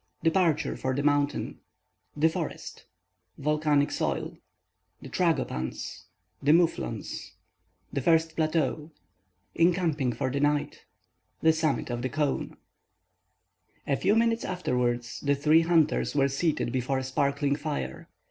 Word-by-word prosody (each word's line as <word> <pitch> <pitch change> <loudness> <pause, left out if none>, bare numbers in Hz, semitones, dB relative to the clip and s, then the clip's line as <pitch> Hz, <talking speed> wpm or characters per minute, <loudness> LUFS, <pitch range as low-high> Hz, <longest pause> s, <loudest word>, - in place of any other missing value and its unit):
—DEPARTURE 165 -1 +2
FOR 130 0 -1
THE 140 - -1
MOUNTAIN—THE 145 +1 -1
FOREST—VOLCANIC 145 - -2
SOIL—THE 90 +7 -6
TRAGOPANS—THE 95 - -2
MOUFFLONS 165 - 0 0.6
—THE 140 - -1
FIRST 165 +2 +2
PLATEAU—ENCAMPING 150 - -1
FOR 125 +3 -2
THE 140 - -1
NIGHT—THE 145 +2 -2
SUMMIT 155 -5 -1
OF 120 0 -3
THE 130 - -2
CONE 145 +1 -2 1.3
A 140 - +1
few 195 +8 +2
minutes 230 0 +2
afterwards, 125 -9 -1
the 140 0 +1
three 155 +3 +4
hunters 165 -3 +2
were 140 -1 +4
seated 140 -2 0
before 130 +2 -1
a 130 - -2
sparkling 140 +2 0
fire. 150 -1 -5
145 Hz, 100 wpm, -28 LUFS, 130-160 Hz, 1.3 s, three